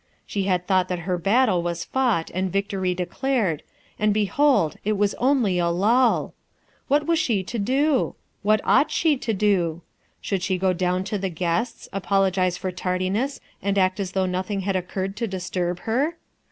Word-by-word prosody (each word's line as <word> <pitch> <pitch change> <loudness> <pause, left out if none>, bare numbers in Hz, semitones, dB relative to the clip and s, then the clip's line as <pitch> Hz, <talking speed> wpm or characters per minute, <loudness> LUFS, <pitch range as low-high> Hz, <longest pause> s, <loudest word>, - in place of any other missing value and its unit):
She 200 -2 -2
had 180 -2 0
thought 185 -1 +2
that 180 -1 -3
her 180 -2 -1
battle 200 0 +3
was 170 0 -3
fought 245 -11 0
and 185 0 -1
victory 195 -2 -1
declared, 185 - -1 0.4
and 210 0 +3
behold 215 - +2
it 215 - +1
was 205 0 +1
only 245 -8 +2
a 170 - +2
lull! 225 +8 +2 0.5
What 290 +2 +2
was 335 0 +2
she 210 -6 +1
to 230 +5 -4
do? 265 +6 +1 0.3
What 215 0 +3
ought 295 - +4
she 320 -3 +2
to 235 - -2
do? 185 -5 +1 0.4
Should 195 -3 -2
she 185 0 0
go 185 0 +2
down 180 +1 0
to 205 +1 -3
the 190 0 -2
guests, 180 +7 -2
apologize 190 -2 +1
for 185 0 -3
tardiness, 185 +8 -1 0.2
and 200 0 0
act 185 0 +2
as 190 -2 -3
though 190 -1 +1
nothing 185 +2 -2
had 195 0 -1
occurred 185 +1 -3
to 230 0 -1
disturb 180 -2 -3
her? 280 +9 0
195 Hz, 175 wpm, -24 LUFS, 180-225 Hz, 0.5 s, ought